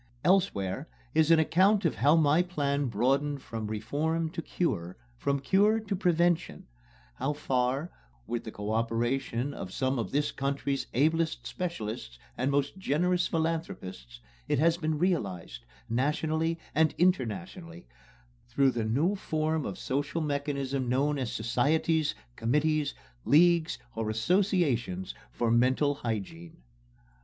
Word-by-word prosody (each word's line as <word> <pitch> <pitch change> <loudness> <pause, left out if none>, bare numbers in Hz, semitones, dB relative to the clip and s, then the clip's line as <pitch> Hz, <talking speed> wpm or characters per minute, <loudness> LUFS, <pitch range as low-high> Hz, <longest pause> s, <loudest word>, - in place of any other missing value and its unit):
Elsewhere 140 - +1 0.3
is 160 -1 +3
an 165 - +7
account 190 +5 +3
of 165 - +2
how 145 +6 +4
my 155 +1 +4
plan 145 -6 -1
broadened 135 +6 +1
from 110 -2 -5
reform 150 +10 -1
to 165 - -4
cure, 95 - -2 0.2
from 140 +3 -1
cure 205 +9 +3
to 210 -2 -3
prevention 175 -2 +1 0.5
how 145 +2 -1
far, 135 +3 -1 0.3
with 120 - -3
the 110 - -7
co 105 0 -5
operation 120 +3 -1
of 90 - -7
some 130 +3 0
of 110 -5 -2
this 145 +1 0
country's 140 0 -2
ablest 155 -2 +1
specialists 110 - -5 0.2
and 130 +2 0
most 140 +6 0
generous 180 +3 +1
philanthropists, 160 - -3 0.3
it - - +1
has 165 +4 +4
been 155 -2 -1
realized, 100 - -2 0.2
nationally 155 +6 0 0.2
and 160 0 +3
internationally, 180 - -1 0.6
through 135 -1 +3
the 120 -2 -2
new 145 - +2
form 155 -4 -1
of - - -5
social 145 +5 -2
mechanism 140 -3 -2
known 140 +3 +1
as 125 -4 -2
societies, 150 +7 +1 0.2
committees, 150 +4 +1 0.3
leagues 165 -2 +4 0.2
or 110 -1 -2
associations 120 - +1 0.2
for 115 - 0
mental 130 +5 +3
hygiene. 95 - -5
145 Hz, 130 wpm, -29 LUFS, 120-165 Hz, 0.6 s, an